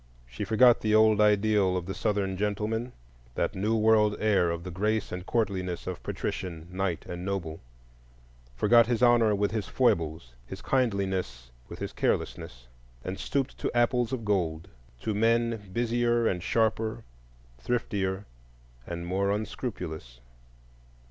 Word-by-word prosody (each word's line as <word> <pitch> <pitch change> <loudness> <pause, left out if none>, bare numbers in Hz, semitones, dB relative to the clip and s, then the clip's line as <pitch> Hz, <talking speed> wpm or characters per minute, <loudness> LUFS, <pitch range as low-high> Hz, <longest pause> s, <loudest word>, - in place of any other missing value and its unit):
She - - -6
forgot 120 +2 +5
the 110 0 +2
old 110 -1 +5
ideal 105 -2 +3
of 90 - -4
the 95 - -4
Southern 95 0 -1
gentleman,—that 100 - -3
new 105 +4 0
world 110 -1 +4
heir 100 -5 +3
of 85 0 -3
the 90 - -6
grace 105 +4 -1
and 90 0 -5
courtliness 95 -6 -1
of - - -5
patrician, 85 -3 -4
knight, 95 -2 -2
and 90 0 -6
noble; 90 -5 -3 1.0
forgot 115 - +5
his 120 0 0
honor 120 -3 +5
with 100 0 0
his 110 -3 -3
foibles, 80 - 0
his 95 - -9
kindliness 95 - -1 0.2
with - - -8
his - - -5
carelessness, - - -2 0.4
and 95 +1 -5
stooped 140 -1 -2
to - - -1
apples 120 0 +2
of 120 -4 -3
gold,—to 80 - -3
men 115 -1 +1
busier 120 +1 +1
and 90 -5 0
sharper, 110 +3 0 0.6
thriftier 100 - -2 0.6
and 85 0 -5
more 95 +3 0
unscrupulous. 90 - -4
100 Hz, 135 wpm, -28 LUFS, 90-110 Hz, 1.0 s, forgot